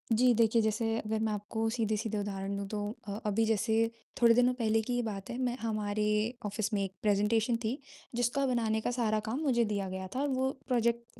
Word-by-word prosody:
जी, 245 +2 +5
देखिए, 230 0 +4
जैसे 225 +1 0
अगर 215 0 -2
मैं 220 -1 0
आपको 215 +2 -2
सीधे-सीधे 220 -1 -1
उदाहरण 200 -1 -3
दूँ 200 0 -4
तो 210 +1 -3 0.3
अ, 200 +1 -4
अभी 215 +2 +2
जैसे 225 +1 +2 0.3
थोड़े 235 -1 +7
दिनों 245 +1 +4
पहले 225 -3 +1
की 245 +3 -3
ही 245 - +1
बात 200 -3 -5
है 240 - -4
मैं 245 0 0
हमारे 215 -2 -1 0.4
ऑफिस 215 +2 -2
में 200 -1 +1
एक 195 -1 -4
प्रेज़ेंटेशन 215 +3 +2
थी, 225 +5 -1 0.4
जिसका 245 +3 +1
बनाने 225 -4 +1
का 245 - -1
सारा 225 -3 +1
काम 250 +5 -1
मुझे 240 -5 +3
दिया 200 -2 -2
गया 190 0 -5
था 265 - 0
और 290 - +1
वो 265 -1 +1 0.2
प्रोजेक्ट 235 -2 0
225 Hz, 210 wpm, -31 LUFS, 210-235 Hz, 0.4 s, थोड़े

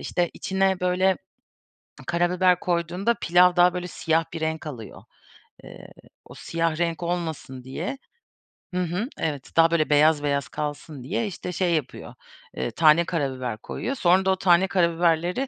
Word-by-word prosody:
işte, 175 -2 -1
içine, 190 -1 0
böyle, 180 +1 +2 0.9
karabiber 180 +1 +2
koyduğunda 175 +6 0
pilav 180 +1 +4
daha, 180 0 +5
böyle, 180 0 -4
siyah 165 -1 0
bir 165 - -5
renk 160 0 -3
alıyor. 115 -8 -9 0.6
Eee, - - -12 0.4
o - - -13
siyah 165 -1 -2
renk 170 +1 -2
olmasın 160 -7 -4
diye 160 - -5 0.8
Hı 180 - 0
hı, 180 +6 -2
evet. 145 -4 -3
Daha 165 0 +6
böyle 165 -2 +1
beyaz 150 0 +4
beyaz 140 -1 -1
kalsın 145 -2 -6
diye, 215 - -2
işte, 180 -1 -6
şey 180 0 0
yapıyor, 155 -6 -4 0.4
eee, 65 - -2
tane 165 +1 +4
karabiber 130 -8 -3
koyuyor. 265 - -5
Sonra 185 -2 +3
da 190 - +3
o - - +2
tane 185 0 +3
karabiberleri 170 +5 +1
170 Hz, 150 wpm, -24 LUFS, 155-180 Hz, 0.9 s, Daha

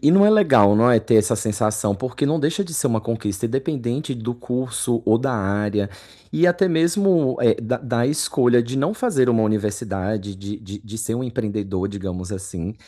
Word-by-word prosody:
e 150 - +6
não 195 +3 +6
é 210 - +6
legal, 135 - +5
não 120 +3 +4
é? 115 - +5
Ter 110 +1 +2
essa 110 +2 +3
sensação. 105 -1 -1
Porque 125 +7 -3
não 155 +2 +1
deixa 160 +7 0
de 170 - -10
ser 145 - 0
uma 115 -4 +1
conquista, 110 -3 -4
independente 135 +2 -2
do 120 +1 -4
curso 125 -1 -2
ou 110 +1 +3
da 130 0 -1
área 100 0 -1 0.4
e 175 - +3
até 175 +2 +3
mesmo, 170 - +2
eh, 115 -1 +3
da 120 +3 -1
da 120 -1 -1
escolha 125 -4 +2
de 120 +3 -6
não 145 +9 0
fazer 220 - +1
uma 115 -2 +3
universidade 105 -1 -2
de 100 +2 -7
de 105 -1 -9
de 110 +1 -10
ser 110 0 -2
um 125 - -3
empreendedor, 105 -6 -3
digamos 95 -1 -6
assim. 95 0 -6
115 Hz, 195 wpm, -21 LUFS, 105-135 Hz, 0.4 s, e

